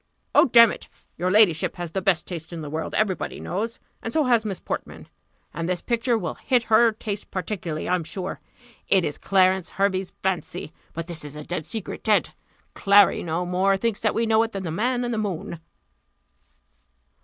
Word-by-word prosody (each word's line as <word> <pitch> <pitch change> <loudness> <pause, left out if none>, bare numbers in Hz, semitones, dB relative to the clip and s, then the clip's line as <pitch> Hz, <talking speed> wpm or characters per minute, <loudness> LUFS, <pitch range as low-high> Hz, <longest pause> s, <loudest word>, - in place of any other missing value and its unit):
"Oh, - - +7
damn 235 -3 +7
it! - - -8 0.3
your 180 +2 -1
ladyship 185 -5 +4
has 175 -2 -5
the 190 - -2
best 180 -3 +1
taste 165 -2 -7
in 170 -2 -6
the 145 - -7
world, 160 +1 -3
every 215 -3 +2
body - - -6
knows; 220 +5 -3 0.2
and 225 - -4
so 315 +3 +2
has 240 -4 +3
Miss 195 -4 -3
Portman - - -6 0.5
and 165 +2 -3
this 180 -1 -1
picture 235 0 +1
will - - -3
hit 250 -3 +1
her 225 +1 +5
taste 210 -2 -5
particularly, 180 -4 -4
I'm 180 -1 +1
sure. 180 +4 -5 0.5
It 190 -3 +3
is 145 - -4
Clarence 190 -2 +2
Hervey's 195 -1 -1
fancy; 180 -3 -3 0.2
but 165 0 -4
this 170 -3 -5
is 145 0 -8
a 150 - -7
dead 165 -1 -5
secret 220 -4 -6
dead 215 -2 +2 0.4
Clary 200 -1 +5
no 170 +2 -2
more 190 +2 +2
thinks 225 +1 -1
that 215 - 0
we 230 - +1
know 220 0 +4
it, 225 0 -2
than 195 -1 -4
the 165 - -3
man 245 +8 0
in 240 - -2
the 225 - -1
moon." 180 -5 -4
190 Hz, 195 wpm, -24 LUFS, 175-220 Hz, 0.5 s, Oh